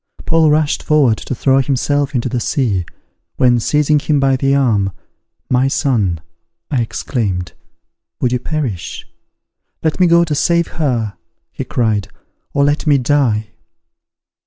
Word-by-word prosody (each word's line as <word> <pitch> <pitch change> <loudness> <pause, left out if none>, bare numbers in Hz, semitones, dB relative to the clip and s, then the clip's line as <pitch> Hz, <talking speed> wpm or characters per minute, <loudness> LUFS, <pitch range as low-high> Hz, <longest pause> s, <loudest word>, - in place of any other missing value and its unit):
Paul 160 -1 +3
rushed 150 0 +1
forward 140 -8 +3
to 130 - -5
throw 135 +2 +3
himself 140 +1 0
into 120 0 0
the 125 -1 -2
sea, 105 - -1 0.5
when, 125 -2 +3
seizing 150 +4 +2
him 145 0 +1
by 135 -1 +3
the 135 +1 +1
arm, 110 -8 +2 0.6
"My 130 +1 +2
son," 110 - 0 0.5
I 130 -4 +1
exclaimed, 100 - -3 0.7
"would 125 - 0
you 125 - 0
perish?" 125 - -4 0.8
"Let 160 +2 0
me 180 - +5
go 170 0 +5
to 155 -3 -2
save 170 +3 +1
her," 120 -10 -2 0.3
he - - -5
cried, 110 -5 0 0.4
"or 140 - +1
let 145 +2 0
me 145 -2 +5
die!" 125 -5 +1
135 Hz, 140 wpm, -17 LUFS, 115-150 Hz, 0.8 s, me